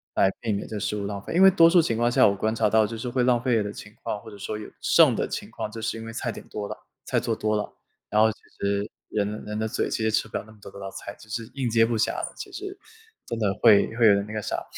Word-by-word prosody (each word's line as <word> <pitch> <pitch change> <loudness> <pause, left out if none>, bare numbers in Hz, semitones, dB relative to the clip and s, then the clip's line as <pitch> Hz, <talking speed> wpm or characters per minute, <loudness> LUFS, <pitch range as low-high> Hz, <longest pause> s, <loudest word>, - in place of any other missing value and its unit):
来 95 - +4
避 115 -3 -1
免 100 - -3
这 110 - -5
食 105 - -2
物 100 - -3
浪 100 0 -4
费。 - - -6
因 175 - +3
为 195 - +10
多 165 -3 +7
数 175 0 +6
情 115 -8 -1
况 120 +1 +2
下 - - +6
我 100 - +1
观 110 +3 0
察 110 -2 +2
到 110 +1 +4
就 115 - -6
是 125 +3 -4
会 125 0 +1
浪 120 -1 +3
费 120 -4 +2
的 105 0 -5
情 105 0 -11
况， 105 - -3
或 110 - -11
者 105 - -11
说 105 +2 -4
有 105 - -8
剩 - - +5
的 - - -1
情 - - -5
况， 105 - -5
就 115 +1 -7
是 115 - -2
因 115 - -7
为 115 - -7
菜 120 0 -2
点 - - -10
多 105 -1 -5
了， - - -6 0.3
菜 - - +1
做 115 - -1
多 110 0 0
了。 105 - -4 0.4
然 105 - +3
后 110 0 +5
其 - - -12 0.2
实 100 +1 0 0.2
人 105 -1 0
的 105 +1 -5
人 105 - -3
的 110 - 0
嘴 - - -1
其 110 - -2
实 110 - +2
吃 110 - +1
不 - - -3
了 - - -5
那 - - -14
么 105 - -21
多 - - -10
的 100 - -11
道 95 -1 -6
菜， 100 - -8
其 - - -15
实 115 +1 -4
应 135 -3 -1
接 115 0 +4
不 115 0 -1
暇 110 - +2
了， - - -4
其 - - -8
实 390 -1 -7 0.5
真 115 - -4
的 105 -3 +2
会 110 -4 +7
会 120 - +4
有 105 - +8
点 100 - 0
那 105 - -8
个 - - -1
啥。 - - -3
110 Hz, 345 characters per minute, -25 LUFS, 105-115 Hz, 0.5 s, 为